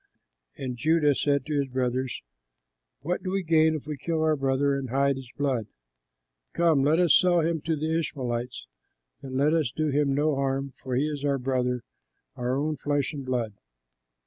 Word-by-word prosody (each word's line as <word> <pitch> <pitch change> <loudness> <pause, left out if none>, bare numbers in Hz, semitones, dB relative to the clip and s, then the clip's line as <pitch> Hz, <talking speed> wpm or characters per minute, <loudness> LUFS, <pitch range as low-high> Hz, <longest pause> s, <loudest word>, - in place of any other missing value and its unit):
And 125 -2 -4
Judah 155 +1 +3
said 140 0 +1
to 150 -2 -1
his 140 - 0
brothers, 130 0 -2 0.8
"What 175 +5 -2
do 185 - -4
we 195 0 -1
gain 160 -1 +4
if 150 - -6
we 150 -1 -5
kill 160 +3 -1
our 155 -1 +3
brother 135 0 +1
and 135 -2 -4
hide 140 +2 +2
his 130 -2 -9
blood? 130 -7 0 0.9
Come, 165 -5 +3
let 150 +3 +3
us 175 -4 +4
sell 175 -2 +5
him 160 -1 0
to 160 +1 -1
the 160 +2 0
Ishmaelites, 125 - -4 0.6
and 130 -1 -5
let 145 +3 +3
us 160 -6 +2
do 155 +5 -1
him 140 -1 +1
no 150 +1 +2
harm, 135 0 -1
for 125 +1 -3
he 135 +4 +2
is 145 -2 -4
our 140 -1 +1
brother, 125 -2 -1 0.5
our 125 +2 -1
own 150 +1 -1
flesh 145 0 -1
and 140 -2 -5
blood." 120 -4 -2
140 Hz, 185 wpm, -27 LUFS, 130-155 Hz, 0.9 s, sell